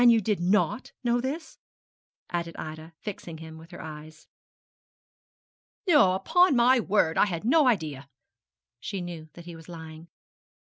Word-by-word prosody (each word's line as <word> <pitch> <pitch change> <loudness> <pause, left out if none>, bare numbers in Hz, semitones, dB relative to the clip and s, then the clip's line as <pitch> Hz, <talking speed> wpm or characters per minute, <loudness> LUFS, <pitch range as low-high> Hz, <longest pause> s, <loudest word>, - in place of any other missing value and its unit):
you 230 -1 +6
did 210 -2 0
not 180 +4 +1
know 240 0 +2
this?' 295 +6 -5 0.7
added 170 -1 -3
Ida, 155 +1 -7
fixing 175 -5 -7
him 160 0 -10
with 165 +1 -14
her 175 - -9
eyes. 155 0 -10 1.6
'No, 290 - +6
upon 355 - +4
my 245 +2 +5
word. 195 -7 +2
I - - +5
had 170 0 -4
no 285 +3 +5
idea!' 150 - -1 0.7
She 195 - -4
knew 170 -3 -7
that 170 - -12
he 170 -1 -8
was 165 +1 -13
lying. 160 -1 -10
175 Hz, 145 wpm, -27 LUFS, 160-230 Hz, 1.6 s, you